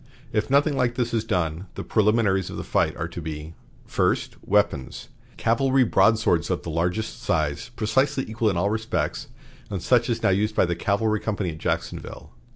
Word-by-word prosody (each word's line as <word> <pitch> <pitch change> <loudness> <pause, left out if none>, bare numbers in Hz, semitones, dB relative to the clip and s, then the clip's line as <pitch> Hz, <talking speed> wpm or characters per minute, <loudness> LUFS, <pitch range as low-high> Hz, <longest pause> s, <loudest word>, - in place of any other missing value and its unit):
If 110 0 0
nothing 140 +2 +3
like 120 -2 +1
this 120 -2 -1
is 115 -2 +1
done, 90 -3 -1
the - - -5
preliminaries 105 -3 +2
of - - -6
the - - -4
fight - - 0
are 85 - -2
to 85 - -7
be: 80 0 -6 0.3
"First. - - 0
Weapons: 100 -11 0 0.3
Cavalry 130 +3 +3
broadswords 110 -7 +3
of 90 - -1
the 80 - -5
largest 90 +7 -2
size, 75 +9 -1
precisely 130 +5 +1
equal 110 0 0
in 95 - -1
all 100 +4 +1
respects, 90 -8 -2 0.4
and 100 -3 -3
such 120 +5 +2
as 115 - -1
now - - +4
used 105 +3 +1
by - - +4
the 85 0 -1
cavalry 105 +4 +1
company 100 -5 -2
at 80 - -9
Jacksonville. - - -4
105 Hz, 180 wpm, -24 LUFS, 85-115 Hz, 0.4 s, now